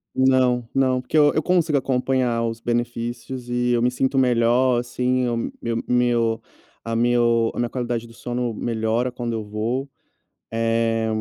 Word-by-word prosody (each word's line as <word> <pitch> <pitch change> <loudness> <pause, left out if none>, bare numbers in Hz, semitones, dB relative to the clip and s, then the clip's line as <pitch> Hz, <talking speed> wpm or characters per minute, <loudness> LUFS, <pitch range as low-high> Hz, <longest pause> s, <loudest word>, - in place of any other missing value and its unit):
Não, 130 -2 +3
não, 130 -1 +2
porque 130 - -6
eu 145 -1 +6
eu 155 - +1
consigo 170 -5 +2
acompanhar 125 -2 0
os 115 0 -3
benefícios, 120 +1 -3
e 120 0 0
eu 120 - +2
me 125 - +2
sinto 130 +2 0
melhor, 125 0 +3
assim. 125 +1 0
O 120 -1 -1
meu - - -3
meu 115 -1 -2 1.0
a 115 0 -3
meu 120 -1 +2
a - - -6
minha 120 -1 0
qualidade 120 -2 -3
do 115 - -15
sono 120 0 -3
melhora 115 +2 -1
quando 120 -1 -4
eu 110 -1 -3
vou, 110 +6 -3 0.6
eh, 115 0 +1
120 Hz, 160 wpm, -22 LUFS, 115-130 Hz, 1.0 s, eu